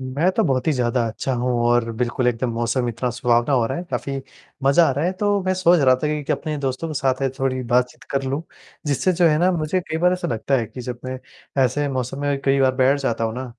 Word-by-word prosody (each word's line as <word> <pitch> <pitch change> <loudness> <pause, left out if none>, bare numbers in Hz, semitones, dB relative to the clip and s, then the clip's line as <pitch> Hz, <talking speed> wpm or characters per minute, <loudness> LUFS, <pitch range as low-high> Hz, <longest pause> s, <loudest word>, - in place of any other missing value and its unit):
मैं 140 +8 0
तो - - +1
बहुत 130 -3 0
ही 155 - +3
ज़्यादा 120 -2 0
अच्छा 130 +4 -3
हूँ 125 +1 -1 0.2
और 120 -1 +2
बिल्कुल 120 +2 -1
एकदम 120 0 0
मौसम 120 +2 -1
इतना 120 +2 -2
सुहावना 120 +2 +1
हो 120 -3 +3
रहा 145 - -3
है 175 - -5
काफ़ी 140 - -3 0.5
मज़ा 140 +5 +5
आ - - +2
रहा 145 +5 -1
है, 185 - +1
तो 205 +1 0
मैं 185 0 +1
सोच 180 -2 +4
रहा 130 -2 +5
था 140 +4 -2
कि 150 -1 -2
कि, - - 0
अपने 155 -2 -3
दोस्तों 135 +3 -3
के 155 - -5
साथ 135 -2 0
ये 135 - +2
थोड़ी 130 -1 -1
बातचीत 125 0 +1
कर 135 -1 0
लूँ, 135 +4 -2 0.4
जिससे 145 +6 +1
जो 175 -1 +3
है 150 - +3
ना 180 +3 +3
मुझे 165 +2 0
कई 160 - 0
बार 180 +2 +3
ऐसा 185 - -2
लगता 115 +4 -1
है 115 - -2
कि 125 - -9
जब 125 0 -5
मैं 130 0 -4 0.5
ऐसे 145 +4 0
मौसम 130 0 -3
में 145 -1 0
कई 135 0 +3
बार 130 -1 +3
बैठ 130 +2 +3
जाता 115 -4 -1
हूँ 110 - -2
ना, 130 +1 -4
135 Hz, 260 wpm, -22 LUFS, 125-150 Hz, 0.5 s, मज़ा